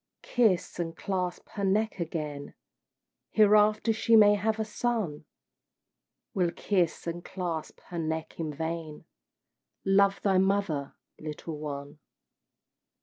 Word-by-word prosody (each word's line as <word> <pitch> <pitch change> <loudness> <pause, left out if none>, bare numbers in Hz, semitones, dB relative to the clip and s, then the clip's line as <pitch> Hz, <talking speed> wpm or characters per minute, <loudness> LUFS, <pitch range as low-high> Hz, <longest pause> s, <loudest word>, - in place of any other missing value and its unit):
Kiss 215 -8 +1
and 165 -1 -3
clasp 185 -2 -3
her 200 - -5
neck 205 +1 +1
again, 150 -4 -4 0.7
Hereafter 215 +1 +4
she 225 +1 +3
may 210 -1 +8
have 215 +2 0
a 220 - 0
son 210 -9 -2 1.1
Will 180 -3 +2
kiss 175 -1 0
and 170 0 -4
clasp 175 -4 -4
her 175 - -4
neck 160 0 -3
in 160 -2 -2
vain. 160 +1 -5 0.8
Love 195 0 +4
thy 195 -2 +4
mother, 190 -7 0 0.2
little 155 0 -6
one! 145 -1 -6
180 Hz, 115 wpm, -29 LUFS, 160-205 Hz, 1.1 s, may